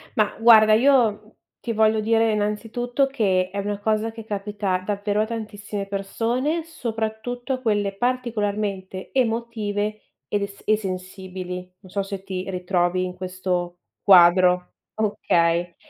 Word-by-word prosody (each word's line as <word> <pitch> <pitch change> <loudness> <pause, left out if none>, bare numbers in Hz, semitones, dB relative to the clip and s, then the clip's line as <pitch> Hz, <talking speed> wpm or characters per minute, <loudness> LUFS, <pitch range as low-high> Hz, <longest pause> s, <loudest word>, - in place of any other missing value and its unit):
Ma 210 -1 +1
guarda, 220 -2 +7
io 225 -4 +3 0.2
ti 235 - -3
voglio 220 0 +3
dire 225 +1 +3
innanzitutto 225 +5 -1
che 190 -8 +1
è 200 - -7
una 205 0 -3
cosa 215 +1 0
che 225 -1 -10
capita 205 -2 -2
davvero 205 +1 0
a - - +1
tantissime 210 -3 -5
persone, 235 +11 -1
soprattutto 240 -2 -4
a 255 - -4
quelle 205 -4 0
particolarmente 205 -5 -2
emotive 220 -4 -1 0.3
ed 205 - -1
es 200 0 -7
e 215 - +4
sensibili. 185 -2 -6 0.2
Non 190 - -16
so 200 0 -1
se 195 -1 -6
ti 185 -1 -5
ritrovi 180 0 0
in 180 0 -6
questo 180 -1 -3 0.3
quadro. 180 -1 +6 0.2
Okay. 175 -5 +1
205 Hz, 130 wpm, -23 LUFS, 190-225 Hz, 0.3 s, guarda